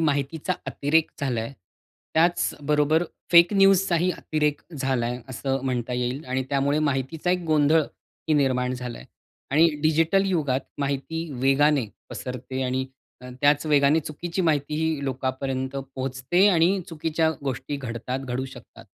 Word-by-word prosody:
माहितीचा 150 +3 0
अतिरेक 155 +3 +1
झालाय, 125 -2 -2 0.6
त्याचबरोबर 155 -2 +2 0.3
फेक 170 +3 +7
न्यूजचाही 195 -2 +4
अतिरेक 150 -3 -1 0.2
झालाय 125 -2 -1
असं 135 +1 -2
म्हणता 125 -1 -2
येईल 125 +4 -2
आणि 130 +1 -1
त्यामुळे 140 +1 +1
माहितीचा 150 +3 -1
एक 180 0 +1
गोंधळही 155 0 +1
निर्माण 130 -3 +1
झालाय 125 -1 -7 0.5
आणि 160 +5 +5
डिजिटल 165 +5 +3
युगात 145 -8 0 0.2
माहिती 145 +4 -2
वेगाने 135 0 +3 0.2
पसरते 130 +1 -5
आणि 130 +1 -1 0.4
अ, 125 - -9
त्याच 145 +1 +3
वेगाने 145 +1 +4
चुकीची 170 +5 -4
माहितीही 155 -1 0
लोकांपर्यंत 130 0 -3 0.2
पोहचते 130 +8 +1
आणि 185 +1 +3
चुकीच्या 160 0 0
गोष्टी 130 +2 -3
घडतात, 125 -1 -4
घडू 130 -1 -3
शकतात. 130 - -12
145 Hz, 120 wpm, -25 LUFS, 130-160 Hz, 0.6 s, फेक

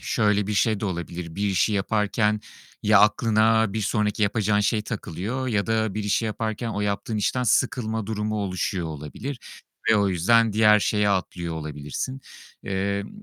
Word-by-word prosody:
şöyle 105 -3 +1
bir 105 - -2
şey 110 0 +2
de - - -3
olabilir. 85 -3 -5
Bir 100 +3 -1
işi 95 +3 +2
yaparken, 105 +1 +1 0.4
ya 105 -1 +5
aklına 110 0 +3
bir 110 - -2
sonraki 105 0 0
yapacağın 105 0 +2
şey 105 +1 +1
takılıyor 110 +5 -4
ya 105 -4 0
da 110 -2 0
bir 105 -1 -3
işi 105 +3 +1
yaparken 110 +1 -3
o 105 -2 -3
yaptığın 105 +2 -2
işten 125 +4 0
sıkılma 110 -2 0
durumu 110 0 -2
oluşuyor 90 -1 -2
olabilir 80 - -6 0.5
ve 110 - +5
o 100 -1 +2
yüzden 110 +5 +3
diğer 105 0 +5
şeye 105 0 +1
atlıyor 90 -3 -2
olabilirsin. 75 - -5 0.4
Emm, 100 +1 -2
105 Hz, 160 wpm, -24 LUFS, 95-110 Hz, 0.5 s, ya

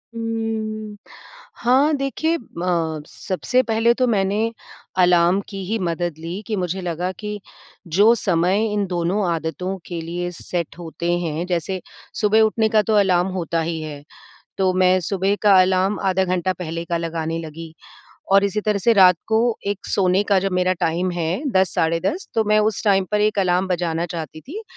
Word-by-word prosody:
उम्म, 220 -2 -3 0.7
हाँ 270 +6 +4
देखिए, 315 +5 -1 0.2
म 165 -3 -1
सबसे 235 +6 -1
पहले 230 0 +2
तो 255 +1 +1
मैंने 210 +1 +1 0.5
अलार्म 180 +1 +4
की 195 -2 -6
ही 220 +5 -1
मदद 175 -2 -2
ली 170 +5 -5
कि 215 - -1
मुझे 185 0 -2
लगा 175 +1 -2
कि 210 -1 -5 0.6
जो 215 +3 +7
समय 185 +1 +1
इन 205 -1 0
दोनों 180 +3 0
आदतों 170 +4 -3
के 175 -2 -5
लिए 175 +2 -4
सेट 170 -1 -5
होते 170 0 -3
हैं 165 0 -3
जैसे 180 +1 -2 0.4
सुबह 215 +1 +4
उठने 220 0 +2
का 215 -1 +4
तो 220 - +2
अलार्म 185 -3 +3
होता 165 -1 -1
ही 160 0 -3
है। 150 -2 -7 0.6
तो 190 -1 +2
मैं 185 0 +4
सुबह 195 +2 0
का 200 -3 +6
अलार्म 190 +2 +1
आधा 190 0 +2
घंटा 185 0 0
पहले 165 -1 -4
का 170 0 -2
लगाने 165 -1 -3
लगी 160 0 -8 0.6
और 195 0 +6
इसी 200 +1 0
तरह 210 -1 0
से 230 +5 +3
रात 185 -4 +6
को 225 +1 +2
एक 200 -1 -3
सोने 185 0 +2
का 200 -2 +4
जो 195 +1 -1
मेरा 185 0 +2
टाइम 175 +3 0
है 175 - -2
10 190 -1 +2
साढ़े 165 +1 +1
10 360 - -2
तो 225 -1 +2
मैं 215 0 +4
उस 215 -1 0
टाइम 195 -2 +3
पर 210 - +2
1 210 0 +1
अलार्म 185 -1 +2
बजाना 170 -1 -1
चाहती 160 -2 -6
थी। 375 - -8
185 Hz, 175 wpm, -21 LUFS, 170-210 Hz, 0.7 s, जो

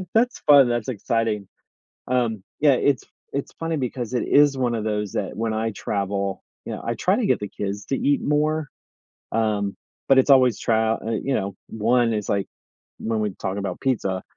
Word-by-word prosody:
That's 245 +2 +2
fun, 140 -4 +6
that's 120 -1 -1
exciting, 115 -3 -1 0.6
um, 120 -5 0 0.2
yeah. 145 -2 +5
It's 130 -1 +1 0.3
it's 140 - -3
funny 165 -1 -1
because 125 -2 -3
it 120 - 0
is 145 -2 +5
one 125 -2 0
of 110 - -2
those 105 -2 -2
that, - - -3
when 110 0 -1
I 110 +1 -1
travel, 100 -1 -2 0.2
you - - -4
know, - - -6
I 115 - 0
try 185 +3 +2
to 240 - 0
get - - +2
the 105 - -4
kids 100 0 -5
to 135 - 0
eat 145 0 +2
more, 150 +1 +1 0.7
um, 105 -3 0 0.3
but 135 -1 +6
it's 130 - +4
always 130 -5 +6
trial 110 0 +1
eh 115 -1 0
you 135 - -1
know, 100 0 -2
1 115 +2 +2
is 105 -2 -3
like, 100 -1 0 0.5
when 110 -1 -1
we 105 -1 0
talk 95 +1 -2
about 95 -3 -4
pizza, 100 -8 -1
115 Hz, 190 wpm, -23 LUFS, 105-135 Hz, 0.7 s, fun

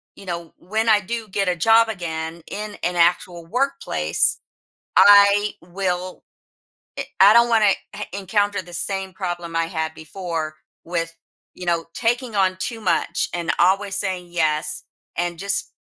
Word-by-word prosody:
you - - -13
know, 170 -2 -5
when 220 +5 -1
I 215 - +6
do 225 +2 -5
get 195 0 -1
a 180 - +1
job 225 +6 +5
again, 165 -4 -5
in 210 0 -5
an 175 0 0
actual 170 0 +1
workplace, 270 +8 0 0.6
I 205 0 +7
will 180 0 -3 0.7
i - - -3
I 195 +2 +9
don't 235 +1 +6
wanna 215 -4 +4 0.2
heh - - -5
encounter 200 +1 0
the 175 -1 -14
same 195 +2 -3
problem 175 -3 -4
I 165 0 +1
had 160 -1 -3
before 160 -1 -5 0.3
with, 165 -1 -3 0.4
you 180 - -8
know, 170 -1 +1
taking 240 0 -1
on 185 -1 +2
too 230 +3 -4
much, 205 - 0
and 170 -1 -2
always 195 +2 +2
saying, 185 -3 -3
"Yes." 155 -2 0 0.3
And 175 -1 -2
just, 200 +2 -2
185 Hz, 150 wpm, -22 LUFS, 170-205 Hz, 0.7 s, I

